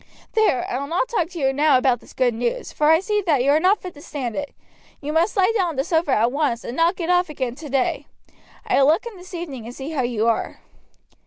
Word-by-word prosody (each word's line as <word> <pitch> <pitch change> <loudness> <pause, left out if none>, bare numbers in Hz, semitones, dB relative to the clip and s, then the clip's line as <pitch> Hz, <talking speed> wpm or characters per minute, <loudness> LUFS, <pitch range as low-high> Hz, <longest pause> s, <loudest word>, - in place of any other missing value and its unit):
There, 435 - +2
I 250 - -2
will 280 - -4
not 350 +10 -1
talk 350 -8 0
to 355 -2 -8
you 270 -2 +1
now 290 -1 +4
about 255 -2 +2
this - - -17
good 250 -2 +1
news, 235 +1 -3
for 300 0 +1
I 320 +2 +5
see 420 +1 0
that 285 -6 +3
you 280 - +3
are 300 - +4
not 385 +5 +3
fit 365 -2 -7
to 290 - -14
stand 265 -7 -5
it. 290 -1 -5 0.4
You 300 +1 -4
must 335 +6 +1
lie 390 +3 +3
down 375 -5 +2
on 330 - -4
the 270 - 0
sofa 325 0 0
at 230 +2 +2
once, 280 -5 -1
and 240 - -6
not 335 +4 +2
get 350 -1 -2
off 360 -1 +2
again 260 -5 -3
today. 275 -2 -2 0.6
I 390 -9 +2
will 270 - +5
look 325 +10 +3
in 470 -3 -7
this 365 +1 -11
evening 280 -10 -6
and 245 - -9
see 275 +3 -6
how 295 -4 -1
you 235 -2 0
are." 230 - -1
300 Hz, 260 wpm, -22 LUFS, 260-350 Hz, 0.6 s, I